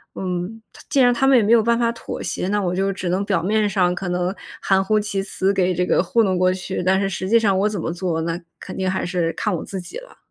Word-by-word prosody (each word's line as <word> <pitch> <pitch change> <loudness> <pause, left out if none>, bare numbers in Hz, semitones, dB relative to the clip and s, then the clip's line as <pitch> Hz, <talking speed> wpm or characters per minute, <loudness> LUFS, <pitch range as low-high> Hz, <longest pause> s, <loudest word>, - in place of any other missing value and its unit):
嗯， 185 +4 -4
他 - - -14
既 295 -2 +1
然 245 -1 +5
他 270 +3 +1
们 270 -2 +6
也 - - +5
没 215 +2 +3
有 230 -2 +5
办 235 +1 +2
法 235 -1 +2
妥 230 - -7
协， 180 - -3
那 205 +1 +1
我 180 -2 -1
就 195 +1 0
只 190 -1 -5
能 185 +3 0
表 190 -4 0
面 210 +3 +1
上 180 -3 +1
可 185 0 -4
能 180 +2 -1 0.3
含 195 0 +2
糊 215 +2 +2
其 205 -2 -2
辞 195 0 -1
给 185 -2 +1
这 180 +1 0
个 180 - +2
糊 230 +6 +2
弄 190 -3 +1
过 185 0 +3
去。 185 0 -4
但 190 +1 +3
是 195 - 0
实 190 0 -4
际 230 +2 +5
上 200 -4 +2
我 205 +2 +2
怎 210 -3 -4
么 - - -3
做， 175 -2 -2
那 165 +1 -2 0.2
肯 - - -8
定 190 -1 -1
还 190 - -2
是 175 -2 -1
看 210 -3 -2
我 165 - -4
自 195 - -6
己 175 - -8
了。 - - -16
190 Hz, 310 characters per minute, -21 LUFS, 180-210 Hz, 0.3 s, 们